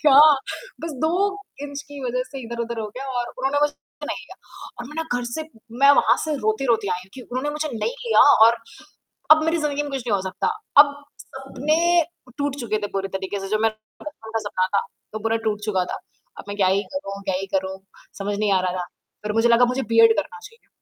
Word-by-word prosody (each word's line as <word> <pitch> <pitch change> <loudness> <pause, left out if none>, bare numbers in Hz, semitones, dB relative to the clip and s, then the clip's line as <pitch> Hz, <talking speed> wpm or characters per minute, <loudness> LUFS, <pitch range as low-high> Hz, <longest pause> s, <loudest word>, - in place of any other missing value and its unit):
क्या 280 -2 +7 0.6
बस 325 -1 -4
2 315 - +3 0.5
इंच 285 0 -6
की 285 -1 -9
वज़ह 250 0 -1
से 270 - -7
इधर-उधर 235 0 -4
हो 215 - -3
गया 270 +1 -5
और 240 - -3
उन्होंने 275 +2 +1
मुझे 295 0 +2 0.3
नहीं - - -3
लिया। - - -13 0.4
और 240 - -5
मैं 300 - -11
ना 325 - 0 0.2
घर 245 - -4
से 240 +7 -4 0.4
मैं 280 - +9
वहाँ 235 +3 +3
से 310 -1 -1
रोते-रोते 220 -1 +1
आई 180 - -2
हूँ, 190 - -24
क्यों? 255 - -10
उन्होंने 260 +4 -1
मुझे 300 +1 -3
नहीं 460 - -1
लिया 455 - +5 0.3
और 235 +1 +4 0.8
अब 315 0 +5
मेरी 325 +1 +2
ज़िंदगी 295 -2 -1
में 290 - -6
कुछ 270 - -2
नहीं 225 - 0
हो - - -2
सकता। 190 - -2 0.3
अब 285 -1 -5 0.3
सपने 270 +3 -2 0.6
टूट 285 -1 -1
चुके 215 -2 -1
थे - - 0
पूरी 195 0 -2
तरीके 190 +1 -4
से 195 - -5
जो 215 +2 +1
मेरा 225 -1 +1 0.3
बचपन 290 -8 -9
था - - +3
सपना 185 -2 0
था - - +4 0.3
वो 215 - -3
पूरा 225 0 +1
टूट 210 -1 0
चुका 190 -4 +1
था। - - -4 0.4
अब - - -8
मैं 200 - -5
क्या 195 -2 +3
ही 195 +2 +2
करूँ 200 -8 -5
क्या 190 -2 -1
ही 195 +1 -4
करूँ, 190 0 -1 0.4
समझ 205 0 -2
नहीं 210 -2 +2
आ 190 - +4
रहा 185 -1 -1
था। 180 - -3 0.4
फिर 210 0 -2
मुझे 235 - +4
लगा 235 +1 +6
मुझे 265 - -1
बी.एड 230 0 +5
करना 190 -3 -3
चाहिए। 460 - -15
235 Hz, 230 wpm, -23 LUFS, 205-285 Hz, 0.8 s, मैं